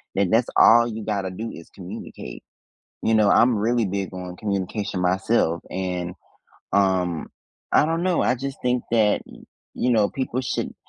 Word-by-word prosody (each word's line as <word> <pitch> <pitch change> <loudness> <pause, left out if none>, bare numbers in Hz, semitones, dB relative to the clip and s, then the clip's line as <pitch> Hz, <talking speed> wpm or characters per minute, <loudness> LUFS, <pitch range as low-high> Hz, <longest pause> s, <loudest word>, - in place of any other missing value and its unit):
that 100 -1 +2
that's 115 +2 +3
all 120 +1 +7
you 110 -1 -5
gotta 100 -3 -2
do 110 +5 -5
is 85 - -11
communicate. 90 -8 -9 0.6
You 110 - +3
know, 105 -2 +4
I'm 115 +2 +4
really 115 +2 +1
big 95 0 -3
on 90 -1 -7
communication 100 -1 -3
myself 90 -2 +1
and, 90 -2 -3 0.6
um, 95 -4 +1 0.5
I - - +5
don't 165 +2 -1
know, 185 -2 +2
I - - +2
just 135 +2 -6
think 125 0 0
that, 110 -3 +3
y - - -14 0.3
you 125 - 0
know, 105 -3 +3
people 130 -1 -2
should 125 - -3
105 Hz, 165 wpm, -23 LUFS, 95-120 Hz, 0.6 s, all